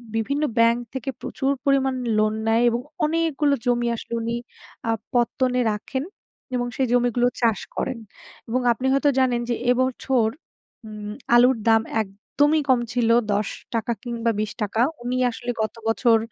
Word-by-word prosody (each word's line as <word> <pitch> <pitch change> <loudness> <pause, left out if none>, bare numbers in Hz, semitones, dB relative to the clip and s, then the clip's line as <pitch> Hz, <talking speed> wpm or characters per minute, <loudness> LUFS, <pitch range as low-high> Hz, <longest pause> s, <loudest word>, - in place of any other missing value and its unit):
বিভিন্ন 280 +7 0
ব্যাংক 230 +1 +4
থেকে 265 -1 -4
প্রচুর 270 +1 -1
পরিমাণ 270 -1 +2 0.2
লোন 215 0 +2
নেয় 225 +1 +3
এবং 235 +1 -1 0.2
অনেকগুলো 310 -2 +1
জমি 240 -1 +1
আসলে 230 - -8
উনি 230 +1 -2 0.5
আ - - +1 0.2
পত্তনে 250 +1 +1
রাখেন, 240 +6 -3 0.5
এবং 245 0 -1
সেই 265 - +1
জমিগুলো 245 0 +3
চাষ 225 -4 +3 0.2
করেন। 260 -3 -2 0.5
এবং 255 +3 +1
আপনি 235 +3 -3
হয়তো 275 +1 +3
জানেন, 250 -2 +2
যে - - +2 0.2
এ - - +7
বছর 255 -2 +1 0.6
উম 210 -1 -7 0.2
আলুর 250 +1 +6
দাম 225 0 +6 0.2
একদমই 280 +10 0
কম 255 -2 +5
ছিল। 240 -2 +1 0.2
৳১০ 215 +2 -2
কিংবা 235 -2 -1
৳২০ 215 0 -2 0.2
উনি 245 +1 -2
আসলে 240 +1 -4
গত 215 - -2
বছর 225 +1 +4
240 Hz, 145 wpm, -23 LUFS, 225-260 Hz, 0.6 s, এ